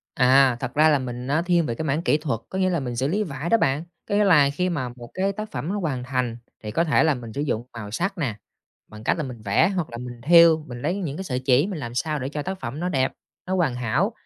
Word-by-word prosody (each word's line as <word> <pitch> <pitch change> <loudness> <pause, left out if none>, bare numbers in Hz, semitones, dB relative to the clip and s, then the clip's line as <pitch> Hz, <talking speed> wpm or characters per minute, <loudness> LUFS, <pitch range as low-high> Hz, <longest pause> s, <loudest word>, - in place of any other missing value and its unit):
À, 130 -2 +5
thật 125 - -4
ra 155 +2 +5
là 145 -2 +3
mình 125 -1 -5
nó 150 +4 +2
thiên 175 -2 +2
về 115 - -2
cái 160 - -4
mảng 150 +2 0
kỹ 150 - +2
thuật, 145 -8 -2
có 190 - -3
nghĩa 185 - +2
là 175 -2 0
mình 125 -3 -4
xử 130 +3 0
lý 200 +8 0
vải 155 -2 -5
đó 230 - +5
bạn! 140 -4 +1 0.3
Có 205 - +1
nghĩa 210 - +4
là 155 -8 +5
khi 180 +4 0
mà 140 -8 -2
một 120 -1 -11
cái 195 +1 0
tác 215 +2 -6
phẩm 155 - -4
nó 205 +2 -1
hoàn 135 -9 -2
thành 125 -3 -2 0.3
thì 105 - -4
có 165 - +2
thể 160 -1 +3
là 160 - +3
mình 115 -3 -8
sử 140 - -3
dụng 125 -5 -2
màu 110 -3 -7
sắc 185 - -2
nè, 135 -10 -1 0.5
bằng 105 0 -12
cách - - +2
là 165 - -2
mình 125 -5 -7
vẽ 100 - +3
hoặc 175 -8 -2
là 120 - -7
mình 120 -1 -8
thêu, 165 0 +6
mình 120 -3 -8
lấy 170 +5 0
những 155 -7 -4
cái 190 - -5
sợi 125 -8 -2
chỉ 130 +4 +3
mình 195 -5 -4
làm 120 -3 -6
sao 150 +3 -1
để 130 - -3
cho 150 +1 -4
tác 190 +4 -5
phẩm 130 +5 -5
nó 180 - -1
đẹp, 130 -6 +1 0.3
nó 185 - -1
hoàn 160 -9 +1
hảo, 120 -3 0
145 Hz, 295 wpm, -24 LUFS, 125-170 Hz, 0.5 s, thêu